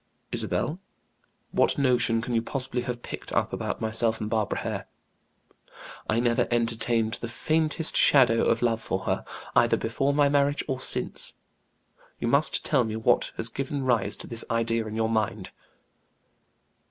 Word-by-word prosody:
"Isabel, 160 Hz, +5 st, -2 dB, 0.7 s
what -, -, +2 dB
notion 125 Hz, -4 st, +2 dB
can 125 Hz, -, -3 dB
you 115 Hz, -, +2 dB
possibly 125 Hz, 0 st, -3 dB
have 120 Hz, -1 st, -4 dB
picked -, -, -7 dB
up -, -, 0 dB
about -, -, -3 dB
myself 110 Hz, 0 st, +2 dB
and 105 Hz, 0 st, -4 dB
Barbara 110 Hz, -2 st, 0 dB
Hare; -, -, -4 dB, 1.2 s
I 110 Hz, -, +2 dB
never 120 Hz, -1 st, +2 dB
entertained 115 Hz, -1 st, +1 dB
the 120 Hz, -, -3 dB
faintest 155 Hz, +6 st, +1 dB
shadow 125 Hz, -5 st, +5 dB
of -, -, +1 dB
love 115 Hz, -2 st, +1 dB
for 95 Hz, -, -2 dB
her, -, -, -1 dB, 0.3 s
either -, -, +4 dB
before 135 Hz, +5 st, 0 dB
my 145 Hz, 0 st, +3 dB
marriage 145 Hz, 0 st, +2 dB
or 130 Hz, -3 st, -2 dB
since. -, -, -1 dB, 0.9 s
You -, -, -2 dB
must 140 Hz, +6 st, +2 dB
tell 135 Hz, -5 st, +3 dB
me 110 Hz, -1 st, -3 dB
what 110 Hz, -, +2 dB
has 115 Hz, -, +1 dB
given 135 Hz, +3 st, -3 dB
rise 120 Hz, -3 st, +1 dB
to -, -, -7 dB
this 115 Hz, -1 st, -3 dB
idea 115 Hz, -1 st, 0 dB
in 110 Hz, -, -6 dB
your 110 Hz, 0 st, +1 dB
mind." 110 Hz, -3 st, -1 dB
115 Hz, 155 wpm, -26 LUFS, 115-135 Hz, 1.2 s, shadow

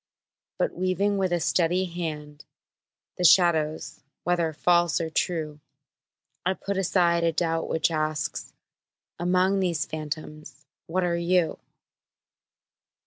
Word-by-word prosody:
But -, -, 0 dB
weaving 195 Hz, +2 st, 0 dB
with 190 Hz, -2 st, 0 dB
a 175 Hz, -, +1 dB
steady 180 Hz, +2 st, +1 dB
hand 150 Hz, -4 st, -6 dB, 0.7 s
The -, -, 0 dB
shadows, 160 Hz, -3 st, +3 dB, 0.2 s
whether 175 Hz, -2 st, +1 dB
false 170 Hz, 0 st, +2 dB
or 165 Hz, -1 st, -3 dB
true, 155 Hz, -4 st, -2 dB, 0.8 s
I 185 Hz, +1 st, 0 dB
put 200 Hz, +3 st, -4 dB
aside 175 Hz, -2 st, +2 dB
a 165 Hz, -, +3 dB
doubt 165 Hz, 0 st, -1 dB
which 160 Hz, +1 st, +1 dB
asks 155 Hz, -1 st, -2 dB, 0.7 s
"Among 185 Hz, +3 st, +2 dB
these 170 Hz, -6 st, 0 dB
phantoms 155 Hz, -2 st, -7 dB, 0.2 s
what 185 Hz, +3 st, 0 dB
are 170 Hz, -1 st, 0 dB
you?" 170 Hz, -1 st, +1 dB
170 Hz, 115 wpm, -26 LUFS, 155-180 Hz, 0.8 s, shadows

